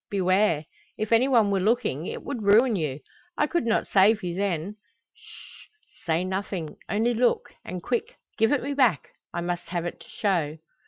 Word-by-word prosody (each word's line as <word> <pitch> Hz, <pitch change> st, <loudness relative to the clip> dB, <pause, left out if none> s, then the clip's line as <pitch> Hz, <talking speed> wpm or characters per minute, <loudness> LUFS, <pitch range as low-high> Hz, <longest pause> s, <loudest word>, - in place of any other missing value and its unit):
Beware! 185 Hz, -4 st, +2 dB, 0.3 s
If 215 Hz, +1 st, -3 dB
any 230 Hz, +3 st, +5 dB
one 230 Hz, -6 st, +4 dB
were 195 Hz, -, +2 dB
looking, 190 Hz, -, 0 dB
it -, -, -6 dB
would 270 Hz, -5 st, -4 dB
ruin 215 Hz, +4 st, +5 dB
you. 150 Hz, -5 st, -3 dB, 0.4 s
I 295 Hz, -, +3 dB
could 300 Hz, -5 st, -1 dB
not 225 Hz, -, +1 dB
save 205 Hz, +2 st, +4 dB
you 175 Hz, -1 st, -2 dB
then. 195 Hz, +1 st, -2 dB, 0.4 s
Sh! -, -, -15 dB, 0.4 s
say 165 Hz, +2 st, +1 dB
nothing, 185 Hz, -4 st, -4 dB
only 225 Hz, +4 st, +1 dB
look, 240 Hz, +1 st, +1 dB
and 180 Hz, -1 st, -6 dB
quick, 470 Hz, +2 st, -2 dB, 0.2 s
give 225 Hz, 0 st, +2 dB
it 290 Hz, -4 st, +1 dB
me 280 Hz, +2 st, -2 dB
back. 250 Hz, -, +2 dB, 0.2 s
I 170 Hz, -, -3 dB
must 175 Hz, 0 st, -3 dB
have 175 Hz, -1 st, -2 dB
it 175 Hz, -, -5 dB
to -, -, -16 dB
show." 170 Hz, -7 st, -1 dB
200 Hz, 180 wpm, -26 LUFS, 175-235 Hz, 0.4 s, any